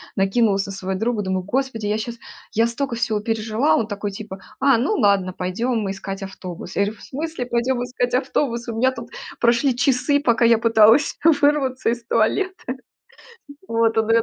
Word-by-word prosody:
накинулась 195 0 +2
на 195 - -6
своего 190 0 -4
друга, 225 -1 0
думаю: 190 -1 -2
"Господи, 245 0 -2
я 210 - 0
щас 235 +1 -5 0.4
я 225 +1 +3
стока 235 +1 -3
всего 220 -2 0
пережила". 225 +5 0
А - - +5
он 220 - -1
такой 205 -1 -4
типа: 195 -1 -8 0.2
"А, 270 -3 +4
ну 275 - +1
ладно, 200 - +2
пойдем 215 +4 -2
искать 195 0 -6
автобус". 185 -2 -8
Я - - +1
говорю: 210 +1 -6
"В - - -15
смысле 310 -2 -4
пойдем 245 +1 0
искать 245 0 -2
автобус? 245 -2 -1
У 230 - -4
меня 255 +3 +2
тут 235 -2 -9 0.3
прошли 235 +2 +3
часы, 270 +3 +2
пока 235 -4 +2
я 230 0 +5
пыталась 225 +4 +4 0.2
вырваться 275 -4 +2
из 235 0 -3
туалета". 370 - +1 1.2
Вот, 230 0 +1
он 220 - +2
на - - -3
меня 230 - +4
230 Hz, 185 wpm, -21 LUFS, 205-250 Hz, 1.2 s, А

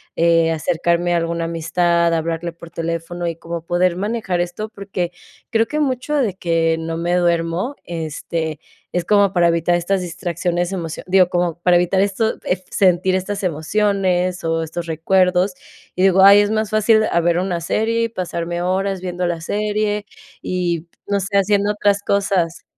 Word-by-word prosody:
eh, 165 -1 +3
acercarme 170 +2 0
a - - +3
alguna 170 0 -2
amistad, 170 +1 +1
hablarle 165 +1 -2
por 170 0 -13
teléfono 165 +1 -4
y 165 - -2
como 170 0 -6
poder 175 +1 +1
manejar 200 -3 -1
esto. 175 +5 -4
Porque 195 -4 -4 0.4
creo 225 -1 +2
que 305 - -2
mucho 275 0 -1
de 245 -9 +1
que 165 -3 0
no 165 0 -4
me 170 +1 -1
duermo, 170 +7 0
este, 160 -1 -4 0.3
es 175 -1 -1
como 200 -1 +4
para 175 -3 +3
evitar 170 +1 +2
estas 185 +3 0
distracciones, 175 0 -2
emocio 170 -4 -5
digo, 185 -1 +4
como 175 -2 -1
para 175 0 +3
evitar 180 +2 +2
esto, 205 +3 0
ef 180 0 -1
sentir 185 -1 +3
estas 195 +2 -2
emociones 185 +1 0
o 165 0 0
estos 170 +2 -5
recuerdos, 180 +3 +2 0.4
y - - -3
digo: 190 0 +5
"Ay, 200 +1 +9
es 205 0 +2
más 215 0 -1
fácil 215 0 +4
a 170 - +3
ver 170 0 +2
una 180 -2 -1
serie 225 +6 0
y - - -4
pasarme 175 -4 -3
horas 190 +1 -1
viendo 180 -1 -2
la 170 -1 -2
serie 210 +2 -1 0.3
y 175 -2 -2 0.2
no 200 0 0
sé, 200 +1 -1
haciendo 200 +1 +2
otras 205 -1 +1
cosas". 195 -5 0
180 Hz, 170 wpm, -19 LUFS, 170-200 Hz, 0.4 s, Ay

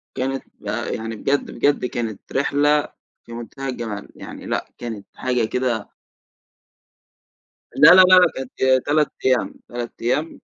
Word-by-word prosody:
كانت 135 +1 -2 0.2
بق - - -3
يعني 115 0 -5
بجد، 140 +6 -1
بجد 145 -3 +1
كانت 115 -4 -4
رحلة 145 +2 +2 0.4
في 115 - -11
منتهى 135 +4 -6
الجمال 110 -5 -5
يعني، - - -10
لأ - - -2
كانت 110 -4 -7
حاجة 125 -3 0
كده 120 -3 -2 1.8
لا 150 - +7
لا 185 - +9
لأ، 185 0 +7
كانت 130 0 +1
3 150 0 +2 0.2
أيام، 130 -2 +2 0.2
3 120 -1 -5
أيام، 145 +7 -1
130 Hz, 130 wpm, -21 LUFS, 115-145 Hz, 1.8 s, لا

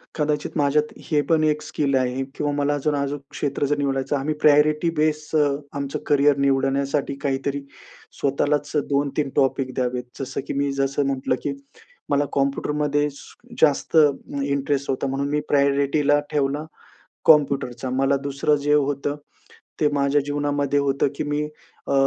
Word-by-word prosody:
कदाचित 150 0 -1
माझ्यात 150 +1 +2 0.2
हे 150 -2 +3
पण 160 -1 +3
एक 150 0 +1
स्किल 140 -2 -1
आहे 130 +1 0
किंवा 145 -1 -1
मला 145 0 +1
अजून 145 +1 0
अजूक 140 0 -2
क्षेत्र 145 0 -2
जर 145 +1 0
निवडायचं 135 0 -1
आम्ही 145 +3 -1
प्रायोरिटी 150 +2 +4
बेस 155 0 0
अ, 150 -1 +4 0.3
आमचं 140 -1 -3
करिअर 145 -1 +4
निवडण्यासाठी 140 +1 +1
काहीतरी, 140 0 -1 0.6
स्वतःलाच 145 +1 0
अ, - - +4
2-3 140 0 0
टॉपिक 135 -1 +1
द्यावेत. 125 -1 -1 0.2
जसं 135 0 -4
की - - -3
मी 140 0 0
जसं 140 +1 0
म्हटलं 130 -1 0
की 145 - -1 0.6
मला 145 0 +2
कॉम्प्युटरमध्ये 145 +1 0
स 140 - -14 0.3
जास्त 155 +1 +3 0.5
इंटरेस्ट 140 0 -1
होता. 135 +1 -1
म्हणून 135 +1 -2
मी 150 +1 +1
प्रायोरिटीला 140 +1 +3
ठेवला 145 +1 0 0.6
कॉम्प्युटरचा. 135 -5 +3
मला 135 +2 +2
दुसरं 140 +2 +1
जे 145 +1 +2
होतं, 145 0 +1 0.6
ते 150 - +4
माझ्या 140 0 +2
जीवनामध्ये 145 -1 0
होतं 140 0 +1
की - - -2
मी 150 0 -1 0.4
अ, - - 0
140 Hz, 150 wpm, -23 LUFS, 135-145 Hz, 0.6 s, प्रायोरिटी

